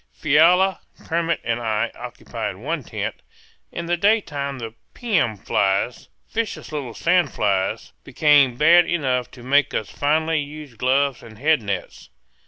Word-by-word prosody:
Fiala, 175 +6 +4 0.3
Kermit, 170 0 -1
and 115 0 -1
I 110 -1 -1
occupied 115 -4 -6
one 145 - -4
tent. - - -5 0.5
In 170 - -5
the 175 +1 0
daytime 155 -9 0
the 115 -3 -7 0.2
"pium" 180 - 0
flies, 100 +4 -1 0.2
vicious 225 -6 -3
little 135 -7 -5
sand 175 -3 +2
flies, 95 -2 -1
became 145 -5 +3
bad 170 +4 +6
enough 130 -7 -1
to 120 - -14
make 140 +2 +2
us 110 - -3
finally 160 +2 +1
use 145 -2 -9
gloves 130 +2 +1
and 110 -2 -13
head 150 +2 +2
nets. 100 -3 -5
140 Hz, 140 wpm, -22 LUFS, 120-165 Hz, 0.5 s, bad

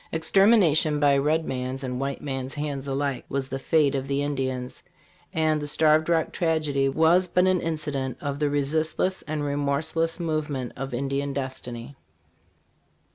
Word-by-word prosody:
Extermination 160 -3 +4
by 145 -1 +4
red 155 +3 +1
man's 130 +1 -4
and 125 -1 -3
white 135 0 -3
man's 135 -1 -4
hands 145 -2 -4
alike 140 -1 -2
was 135 -1 -2
the 135 - -3
fate 150 0 +2
of 135 -1 -2
the 140 +1 0
Indian; 130 -3 -2 0.6
and 155 -1 +1
the 145 - -4
Starved 155 +1 +3
Rock 165 -1 +1
tragedy 155 -5 +1
was 165 +6 +4
but 180 +1 +2
an 185 -1 +2
incident 140 -5 -3
of 140 0 -4
the 150 -1 +1
resistless 155 +6 0
and 155 -1 -4
remorseless 145 +4 -1
movement 155 -6 -2
of 135 0 -5
Indian 140 +2 -2
destiny. 130 -2 -5
145 Hz, 150 wpm, -25 LUFS, 135-160 Hz, 0.6 s, Extermination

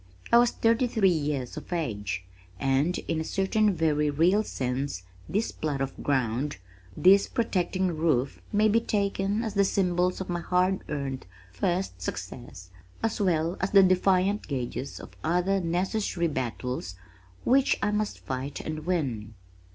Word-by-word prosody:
I 235 - +8
was 240 0 +5
thirty 230 +2 +2
three 205 -5 +3
years 145 -6 -2
of - - -9
age, 105 - -2 0.4
and 135 +6 +1
in 160 - 0
a - - -2
certain 205 +5 +1
very 155 -4 +1
real 170 +8 +3
sense 130 - -3 0.3
this 210 +6 0
plot 150 -3 -3
of 135 0 -4
ground, 130 0 0 0.4
this 195 +2 +6
protecting 185 -6 0
roof 150 -5 0
may 210 +1 +4
be 220 +2 +4
taken 200 0 0
as 220 - -3
the 200 - +3
symbols 180 -2 +1
of 190 - -4
my 175 -1 -2
hard 180 +2 +1
earned 135 -6 -4 0.2
first 95 - -2
success 95 0 -7 0.3
as 225 -1 0
well 170 -2 +1
as 190 - 0
the 195 -1 +7
defiant 190 +2 +2
gages 135 0 -4
of - - -12
other 180 +4 +2
necessary 180 +1 0
battles 125 - -3 0.5
which 265 +2 +3
I 210 - +2
must 210 0 -1
fight 130 +2 -4
and 155 +1 -5
win. 120 - -2
170 Hz, 150 wpm, -27 LUFS, 135-195 Hz, 0.5 s, I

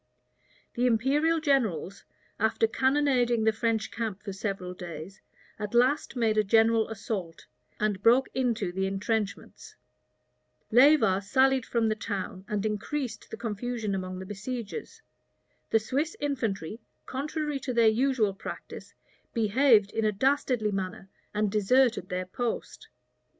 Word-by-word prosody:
The 245 +1 +1
imperial 285 +8 +2
generals, 220 - 0 0.3
after 220 +1 +2
cannonading 255 -2 +2
the 220 - +4
French 220 0 -1
camp 220 -4 -4
for 200 - -5
several 195 -2 -4
days, 175 +2 -9 0.4
at 210 +2 -4
last 260 +4 +2
made 220 -3 +2
a - - +4
general 225 +2 +3
assault, 200 -6 -5 0.3
and 210 -2 0
broke 245 +5 +5
into 235 -7 0
the 190 +1 -1
intrenchments. 205 +1 -3 1.0
Leyva 245 -6 +5
sallied 260 +4 +2
from 230 -2 +1
the 215 - +1
town, 200 -2 -5
and 210 0 -2
increased 230 +5 -3
the - - -7
confusion 225 -1 -3
among 185 -1 -4
the 190 - -7
besiegers. 245 - -6 0.7
The - - +4
Swiss 275 +9 -1
infantry, 225 - -2 0.3
contrary 295 +1 -3
to 265 - -4
their 235 -2 +4
usual 225 -2 +2
practice, 195 - -9 0.4
behaved 225 -1 +4
in 225 - -1
a 215 - +3
dastardly 250 -1 +1
manner, 190 0 -4 0.2
and 210 -1 0
deserted 220 0 +2
their 180 0 -2
post. 235 +5 -4
220 Hz, 130 wpm, -28 LUFS, 200-255 Hz, 1.0 s, broke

